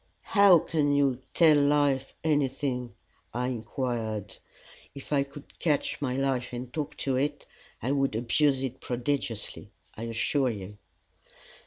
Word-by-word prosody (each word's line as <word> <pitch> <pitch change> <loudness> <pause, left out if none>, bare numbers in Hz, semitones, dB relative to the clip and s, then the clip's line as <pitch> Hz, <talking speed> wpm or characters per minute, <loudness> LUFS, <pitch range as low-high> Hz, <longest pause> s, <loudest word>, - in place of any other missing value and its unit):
"How 200 -3 +8
can 150 -2 +1
you 135 -3 +2
'tell 155 -3 +6
life' 140 -2 +2
anything?" 135 -5 0 0.4
I 125 +1 0
inquired. 115 -3 -3 0.6
"If 140 +2 -6
I 140 - +4
could 140 +1 -9
catch 150 -3 0
my 130 -2 -1
life 130 -3 -1
and 125 0 -6
talk 150 -3 -4
to 135 -2 +1
it, 145 +3 -1 0.4
I 130 - 0
would 135 -4 +1
abuse 135 +4 +2
it 130 0 -4
prodigiously, 120 -2 -3 0.3
I 115 - -5
assure 120 +4 +1
you." 105 -2 -7
135 Hz, 135 wpm, -28 LUFS, 120-145 Hz, 0.6 s, How